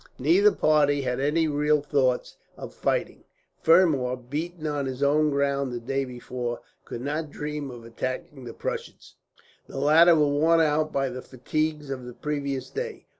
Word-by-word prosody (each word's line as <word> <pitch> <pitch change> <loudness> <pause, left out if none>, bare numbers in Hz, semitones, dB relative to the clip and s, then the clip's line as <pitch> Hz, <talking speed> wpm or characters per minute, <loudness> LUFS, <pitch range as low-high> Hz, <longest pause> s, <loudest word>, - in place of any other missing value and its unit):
Neither 405 +5 +4
party 145 - +2
had 125 0 -2
any 155 +4 +1
real 150 0 +2
thoughts 135 -3 0 0.2
of - - -8
fighting. - - -2 0.4
Fermor, 155 -7 +4
beaten 155 +7 -5
on 145 -2 -1
his 130 +1 -3
own 150 +2 +3
ground 140 -1 0
the 120 - -4
day 135 +3 -2
before, 125 -1 -5 0.3
could 120 - -7
not 150 +3 -3
dream 150 -1 -5
of 120 -2 -10
attacking 130 +3 -5
the 115 - -7
Prussians. - - -6 0.5
The - - -9
latter 160 +5 +6
were 150 -2 +4
worn 155 +4 +3
out 155 -1 +2
by 135 -1 0
the 130 +1 -6
fatigues 150 +3 -3
of 130 -2 -5
the 125 - -8
previous 140 -3 -3
day. 465 0 -5
145 Hz, 165 wpm, -26 LUFS, 130-155 Hz, 0.5 s, latter